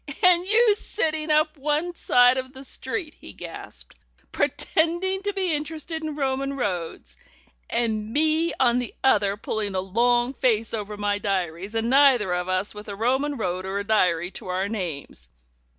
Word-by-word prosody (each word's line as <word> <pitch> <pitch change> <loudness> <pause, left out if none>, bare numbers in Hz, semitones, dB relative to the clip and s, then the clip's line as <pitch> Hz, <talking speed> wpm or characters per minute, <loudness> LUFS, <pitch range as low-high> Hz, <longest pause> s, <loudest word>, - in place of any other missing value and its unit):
"And 360 0 +5
you 435 +1 +5
sitting 315 -7 -2
up 305 +1 +2
one 300 +5 -1
side 250 -5 +4
of 260 0 -7
the 265 0 -10
street," 310 +3 -3
he - - -12
gasped, - - -9 0.4
"pretending 345 +4 0
to 405 0 -1
be 380 -4 -1
interested 315 +2 -4
in 310 -2 -4
Roman 275 -1 -1
roads, 170 - -4 0.5
and 220 -2 -1
me 315 +4 +2
on 245 -1 +4
the 245 - -5
other 205 -6 +3
pulling 210 -2 -3
a - - +1
long 240 +6 +1
face 230 -5 +1
over 210 -1 -4
my 205 0 0
diaries, 190 0 -2
and 225 +2 0
neither 260 -9 +5
of 180 +1 -2
us 185 +2 0
with 210 0 -10
a 200 - -5
Roman 265 +6 0
road 185 -4 -2
or 190 +1 -3
a 200 - -2
diary 180 -5 +1
to - - -8
our 185 +2 -1
names. 165 - -6
245 Hz, 165 wpm, -24 LUFS, 200-305 Hz, 0.5 s, And